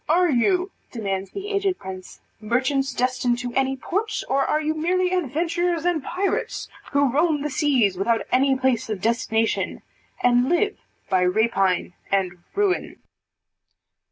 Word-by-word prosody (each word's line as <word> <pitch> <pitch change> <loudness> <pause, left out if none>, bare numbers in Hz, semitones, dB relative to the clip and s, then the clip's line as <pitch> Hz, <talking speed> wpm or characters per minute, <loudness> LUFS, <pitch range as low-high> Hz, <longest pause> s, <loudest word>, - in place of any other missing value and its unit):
"Are 350 +1 +4
you," 360 - +2 0.2
demands 195 -4 -3
the 400 +1 -6
aged 395 -2 0
prince, 185 -1 -9 0.2
"merchants 260 +5 0
destined 250 -1 0
to 245 0 -5
any 270 0 +1
port, 425 +10 -2
or 275 +1 +2
are 305 - +1
you 310 0 0
merely 360 +3 +1
adventurers 340 +1 0
and 340 -5 +1
pirates, 380 +7 -2 0.2
who 280 -2 +3
roam 300 -1 +2
the 300 - -2
seas 250 - +2
without 225 +3 +1
any 270 +1 +3
place 260 -4 0
of 215 -3 -2
destination, 225 +1 0 0.4
and 245 +1 +4
live 405 +5 +2 0.3
by 185 -2 +2
rapine 190 -2 +1 0.2
and 185 -3 0 0.2
ruin." 400 -2 0
270 Hz, 140 wpm, -23 LUFS, 225-345 Hz, 0.4 s, Are